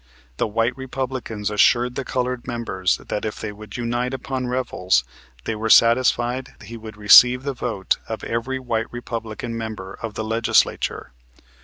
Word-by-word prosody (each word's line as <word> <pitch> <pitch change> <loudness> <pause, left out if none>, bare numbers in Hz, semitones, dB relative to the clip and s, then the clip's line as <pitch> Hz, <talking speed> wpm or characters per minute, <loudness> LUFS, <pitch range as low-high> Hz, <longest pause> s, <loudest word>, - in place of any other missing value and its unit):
The - - +1
white 115 +3 0
Republicans 130 -5 -4
assured 120 +4 +3
the 135 - -3
colored 125 -1 -2
members 115 -7 -1
that 105 - -5
if 110 - -4
they 110 - -4
would 105 +2 -10
unite 120 +2 -1
upon 130 -1 -4
Revels, 120 - +1 0.4
they - - -2
were 110 +1 -3
satisfied 120 +2 +4
he 115 - -8
would 110 -2 -10
receive 125 +5 +7
the 140 0 -2
vote 115 -6 -1
of 110 -2 -5
every 115 +3 -2
white 115 -3 -2
Republican 115 -1 -5
member 110 -4 -6
of 115 -2 -5
the 110 - -3
Legislature. 110 - +1
115 Hz, 155 wpm, -22 LUFS, 110-125 Hz, 0.4 s, receive